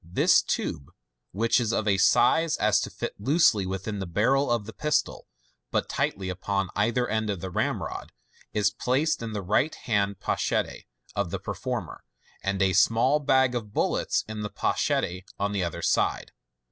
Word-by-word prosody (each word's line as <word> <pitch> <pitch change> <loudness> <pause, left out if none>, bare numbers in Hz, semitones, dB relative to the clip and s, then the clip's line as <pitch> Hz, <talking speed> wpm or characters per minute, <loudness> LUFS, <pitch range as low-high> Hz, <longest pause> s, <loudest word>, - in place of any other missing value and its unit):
This 85 +2 +4
tube, 70 - -3 0.4
which 115 +6 +2
is 115 -2 0
of 110 - 0
such 105 - +3
a - - +1
size 150 - +4
as 105 -1 +3
to - - -3
fit - - -5
loosely 110 - +3
within 95 +2 -4
the 95 - -4
barrel 130 +10 +2
of 120 -3 0
the 110 - -9
pistol, 150 0 -1 0.4
but - - 0
tightly 95 -1 -1
upon 95 +1 -2
either 120 +4 +1
end 110 -1 -1
of 100 -3 -2
the 95 +2 -6
ramrod, - - -3 0.4
is 105 -1 +2
placed 130 +7 0
in 115 -1 -5
the 105 -2 -3
right 110 - +1
hand 100 -4 -1
pochette - - -1 0.3
of 100 -3 -1
the - - -3
performer, - - -5 0.4
and 100 0 0
a 95 -1 +2
small 115 - +4
bag 130 -3 +3
of 110 -4 -5
bullets - - 0
in 110 0 -5
the 105 - -3
pochette 90 -2 -1
on 100 0 -1
the 100 -2 -1
other 85 -1 -4
side. - - +1
105 Hz, 175 wpm, -26 LUFS, 95-120 Hz, 0.4 s, This